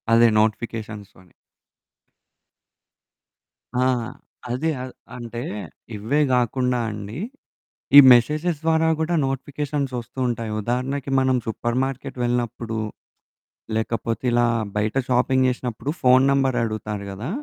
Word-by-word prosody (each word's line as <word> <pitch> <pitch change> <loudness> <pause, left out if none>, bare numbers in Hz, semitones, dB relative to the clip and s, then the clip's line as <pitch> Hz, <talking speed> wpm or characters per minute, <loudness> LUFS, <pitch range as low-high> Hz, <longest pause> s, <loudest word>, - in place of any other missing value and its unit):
అదే. 115 +1 +7
నోటిఫికేషన్స్‌తోని. 105 -4 -3 2.5
ఆ! - - +3 0.7
అది 130 +7 -1
అ - - -4 0.3
అంటే 120 -1 -6 0.5
ఇవే 110 +8 0
గాకుండా 125 0 +1
అండి, 105 +2 -7 0.8
ఈ - - +15
మెసేజెస్ 150 +8 +2
ద్వారా 160 0 +3
గూడా 165 +2 0
నోటిఫికేషన్స్ 140 0 -3
ఒస్తూ 120 +3 -10
ఉంటాయి. 115 -2 -3
ఉదాహరణకి 130 +4 -2
మనం 130 0 +2
సూపర్ 120 +2 -2
మార్కెట్ 135 -1 -5
వెళ్ళినప్పుడు, 120 -2 -2 1.0
లేకపోతే 115 +1 -2
ఇలా 120 0 +3 0.3
బయట 105 +2 -1
షాపింగ్ 130 +1 +3
జేసినప్పుడు 125 +2 -3
ఫోను 130 0 +5
నంబరడుగుతారు 115 -6 -1
గదా! 105 +8 -6
125 Hz, 100 wpm, -23 LUFS, 115-135 Hz, 2.5 s, ఈ